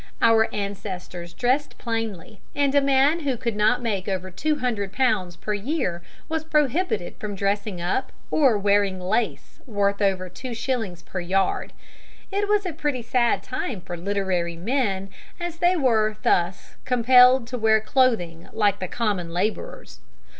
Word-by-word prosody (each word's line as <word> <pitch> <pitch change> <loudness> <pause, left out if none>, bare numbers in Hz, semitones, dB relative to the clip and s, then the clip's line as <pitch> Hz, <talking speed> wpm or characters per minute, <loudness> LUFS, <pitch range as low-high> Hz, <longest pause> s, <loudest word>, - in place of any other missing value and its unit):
Our 225 -1 +4
ancestors 185 -4 -5
dressed 255 +10 0
plainly, 225 -4 -4
and 280 -1 +2
a 285 - +5
man 275 +4 +3
who 275 -6 -1
could 235 -2 -2
not 215 +4 +2
make 200 -5 -2
over 185 -1 -3
two 305 - 0
hundred 230 -8 -2
pounds 190 -8 +1
per 210 +4 -3
year 205 - -2 0.3
was 320 0 -2
prohibited 300 - 0
from 210 -1 -5
dressing 200 -1 -1
up 185 +10 -1 0.2
or 265 -8 +4
wearing 200 -1 +2
lace 215 +6 -2
worth 200 -2 0
over 190 -2 +1
two 240 +7 -7
shillings 225 -8 -3
per 185 - -5
yard. 185 +2 0 0.6
It 405 +1 0
was 415 -1 +2
a 355 - -2
pretty 290 -5 -2
sad 240 0 +1
time 255 -4 -4
for 175 - -6
literary 180 -2 -1
men, 195 -2 -1 0.3
as 345 -1 -4
they 350 +2 +3
were 220 -8 +2
thus 175 +2 0
compelled 250 0 +6
to 255 - -3
wear 220 0 +4
clothing 215 -9 +1
like 205 -2 +2
the 185 - -3
common 200 -6 -2
laborers. 180 - -3
215 Hz, 155 wpm, -24 LUFS, 190-260 Hz, 0.6 s, compelled